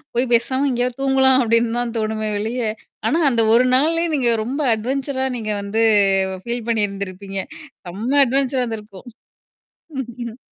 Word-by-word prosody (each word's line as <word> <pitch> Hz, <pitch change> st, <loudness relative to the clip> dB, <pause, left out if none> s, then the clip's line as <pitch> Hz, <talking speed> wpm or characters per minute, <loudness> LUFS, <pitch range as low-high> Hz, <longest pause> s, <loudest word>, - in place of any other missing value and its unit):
போய் 245 Hz, +1 st, +1 dB
பேசாம 260 Hz, +4 st, +1 dB
எங்கேயோ 245 Hz, 0 st, 0 dB
தூங்கலாம் 265 Hz, -1 st, +4 dB
அப்படின்னு 230 Hz, 0 st, +1 dB
தான் 240 Hz, -1 st, -3 dB
தோணுமே 215 Hz, 0 st, -2 dB
ஒழிய 225 Hz, +4 st, -3 dB, 0.5 s
ஆனா 310 Hz, +9 st, +1 dB
அந்த 235 Hz, -3 st, +2 dB
ஒரு 240 Hz, -, +5 dB
நாள் 305 Hz, +5 st, +3 dB, 0.2 s
நீங்க 260 Hz, -5 st, +1 dB
ரொம்ப 265 Hz, +6 st, -4 dB
அட்வென்ச்சரா 265 Hz, +4 st, -2 dB
நீங்க 220 Hz, -3 st, -4 dB
வந்து 200 Hz, +2 st, -3 dB, 0.7 s
பீல் 235 Hz, -1 st, -3 dB
பண்ணி 220 Hz, -2 st, +2 dB
இருந்திருப்பீங்க. 195 Hz, 0 st, -5 dB, 0.5 s
ரொம்ப 215 Hz, +8 st, -4 dB
அட்வென்ச்சரா 265 Hz, 0 st, +1 dB, 1.1 s
இருந்திருக்கும். 245 Hz, -5 st, -8 dB
240 Hz, 130 wpm, -20 LUFS, 220-265 Hz, 1.1 s, ஒரு